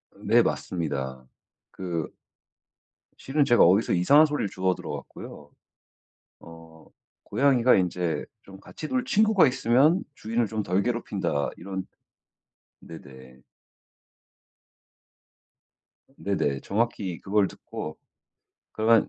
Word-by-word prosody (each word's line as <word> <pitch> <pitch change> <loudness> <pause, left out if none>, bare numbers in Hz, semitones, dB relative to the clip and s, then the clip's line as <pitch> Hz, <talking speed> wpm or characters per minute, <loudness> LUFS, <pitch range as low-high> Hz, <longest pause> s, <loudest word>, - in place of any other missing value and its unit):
네 - - +3
맞습니다. 65 -7 -3 0.5
그 85 -4 -4 1.1
실은 145 +1 0
제가 120 - +5
어디서 95 +6 +4
이상한 140 - +6
소리를 145 -9 -2
주워 95 0 0
들어 - - -7
갖고요. - - -9 0.9
어 80 -1 -15 0.4
'고양이가 130 -3 +3
인제 90 -2 -1 0.2
좀 95 0 -14
같이 155 - -8
놀 255 -1 -1
친구가 215 - +4
있으면 135 +8 +3
주인을 115 -1 -1
좀 110 0 -3
덜 95 +2 0
괴롭힌다.' 100 -11 -2
이런 95 +1 -6 1.0
네네. 65 -5 -13 2.8
네네. 75 -9 -1
정확히 100 -5 -2
그걸 100 0 +2
듣고 75 -3 -8 0.8
'그러면 110 0 +3
100 Hz, 215 characters per minute, -26 LUFS, 85-120 Hz, 2.8 s, 이상한